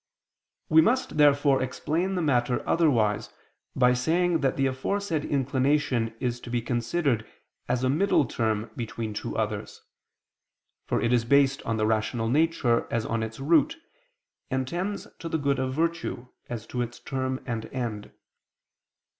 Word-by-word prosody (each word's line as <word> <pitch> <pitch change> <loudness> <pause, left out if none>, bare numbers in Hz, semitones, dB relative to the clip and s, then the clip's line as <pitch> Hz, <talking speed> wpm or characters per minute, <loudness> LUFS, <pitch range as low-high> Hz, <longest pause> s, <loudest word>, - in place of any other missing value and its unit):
We 160 0 +6
must, 240 -1 +1
therefore, 145 -2 +4
explain 165 +8 -1
the 180 - 0
matter 125 -4 +1
otherwise 115 -11 +2 0.5
by 125 -1 +4
saying 165 +6 +1
that 135 -3 0
the 135 - +2
aforesaid 155 +5 -1
inclination 135 -4 +1
is 120 -1 -2
to 120 - -10
be 120 0 0
considered 120 +2 0 0.5
as 125 0 0
a 130 - +2
middle 155 -1 +3
term 110 -1 -1
between 115 -2 -4
two 105 - -4
others: - - -3 1.1
for - - +1
it 120 +1 +1
is 120 -2 +3
based 135 +2 +3
on 115 0 0
the 110 - +1
rational 110 +1 0
nature 145 -4 +2
as 115 -1 -1
on 115 0 -1
its 110 +1 -5
root, 170 - +3 0.7
and 130 -1 -1
tends 185 +6 -3
to 165 - -5
the 160 - 0
good 140 -3 0
of 130 0 -2
virtue, 165 -6 -2 0.2
as 115 -2 -5
to 125 +2 -3
its 120 0 -4
term 130 -1 -3
and 115 -3 -3
end. 115 -5 -4
130 Hz, 155 wpm, -27 LUFS, 115-155 Hz, 1.1 s, We